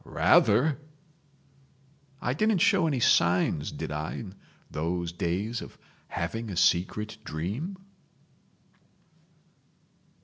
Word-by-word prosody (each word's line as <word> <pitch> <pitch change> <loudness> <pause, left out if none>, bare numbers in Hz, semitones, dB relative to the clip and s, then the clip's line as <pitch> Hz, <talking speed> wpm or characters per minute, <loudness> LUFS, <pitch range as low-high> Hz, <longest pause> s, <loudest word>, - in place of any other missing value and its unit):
"Rather!" 145 +2 +3 1.4
"I 120 - 0
didn't 215 +7 +2
show 190 -2 +3
any 140 -5 0
signs 85 -7 +3
did - - -5
I 75 +1 -3
in 95 -4 -7 0.4
those 85 +2 -2
days 95 +7 -2
of - - -10 0.3
having 110 +7 -4
a 95 - -5
secret 105 +6 +1
dream?" 105 - -4
105 Hz, 95 wpm, -28 LUFS, 85-140 Hz, 1.4 s, Rather